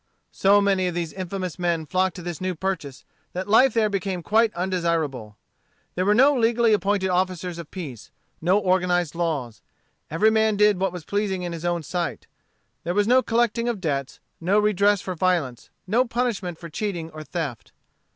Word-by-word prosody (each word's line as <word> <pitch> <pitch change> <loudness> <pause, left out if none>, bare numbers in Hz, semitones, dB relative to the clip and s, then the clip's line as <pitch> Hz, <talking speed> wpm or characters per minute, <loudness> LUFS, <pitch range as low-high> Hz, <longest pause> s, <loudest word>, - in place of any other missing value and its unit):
So 200 +1 +4
many 195 -2 +2
of 175 - -3
these 170 -2 -3
infamous 185 -1 -5
men 170 -2 0
flocked 185 +3 0
to 180 - -8
this 175 -2 -5
New 185 -1 -2
Purchase 165 -7 -4 0.3
that 185 +2 -4
life 250 +5 +5
there 220 -2 +3
became 195 -3 -3
quite 220 +3 +3
undesirable. 165 - -2 0.6
There 185 +2 -1
were 210 - +4
no 275 +5 +6
legally 235 -1 +3
appointed 195 -1 +1
officers 180 -1 -1
of 165 - -8
justice, 140 - -8 0.3
no 180 +4 +3
organized 180 -4 +1
laws. 155 -9 -3 0.5
Every 210 +8 +3
man 220 -1 +2
did 210 -2 +4
what 190 -1 0
was 175 -3 -8
pleasing 200 -3 -1
in 175 -1 -4
his 165 0 -6
own 175 -1 0
sight. 175 +3 -3 0.6
There 175 +2 -2
was 205 0 +2
no 255 +2 +5
collecting 235 0 +1
of 230 -4 -2
debts, 140 -6 -3 0.2
no 185 +5 +2
redress 205 -1 +3
for 185 - -4
violence, 165 -9 -1 0.2
no 225 +7 +3
punishment 230 -8 -2
for 170 - -9
cheating 170 -1 -4
or 155 0 -8
theft. 155 -8 -5
185 Hz, 180 wpm, -24 LUFS, 170-205 Hz, 0.6 s, no